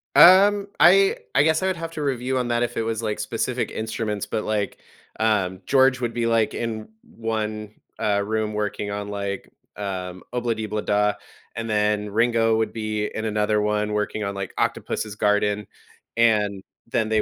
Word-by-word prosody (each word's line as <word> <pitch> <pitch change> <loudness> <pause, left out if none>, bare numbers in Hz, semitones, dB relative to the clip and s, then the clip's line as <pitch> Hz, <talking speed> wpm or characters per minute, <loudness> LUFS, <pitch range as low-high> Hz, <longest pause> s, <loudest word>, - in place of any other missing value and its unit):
Um, 200 +3 +7
I 195 +2 +6 0.2
I 140 - +6
guess 160 +1 +2
I 190 - +1
would 190 - 0
have 165 0 -5
to 160 - -5
review 130 -1 -1
on 125 - -1
that 120 0 +1
if 120 0 -3
it - - +1
was, 115 0 -2
like, 105 -1 -2
specific - - -2
instruments, 110 -2 -3
but, 110 - -3
like, 105 -2 -2 0.4
um, 100 -4 +1
George 130 -1 +4
would 120 -1 -1
be, 120 0 -1
like, 115 -2 +2
in 110 -2 -4
1, 110 -1 -4 0.2
uh, 105 -2 +1
room 110 0 -1
working 105 -1 -2
on, 100 0 -4
like, 100 -1 -4 0.3
um, 95 -2 -5
“Ob-La-Di, 115 -3 -1
Ob-La-Da,” 105 0 +1 0.4
and 115 0 -4
then 105 -1 +1
Ringo 115 +1 +2
would 110 0 -1
be 110 -1 -2
in 110 - -4
another 105 0 +1
one 105 0 0
working 105 +1 -1
on, 100 0 -2
like, 95 -1 -5
“Octopus's 105 -2 -2
Garden.” 105 0 +1 0.5
And 105 -4 +2 0.2
then 115 -2 0
they 110 -1 +3
110 Hz, 175 wpm, -23 LUFS, 105-115 Hz, 0.5 s, Um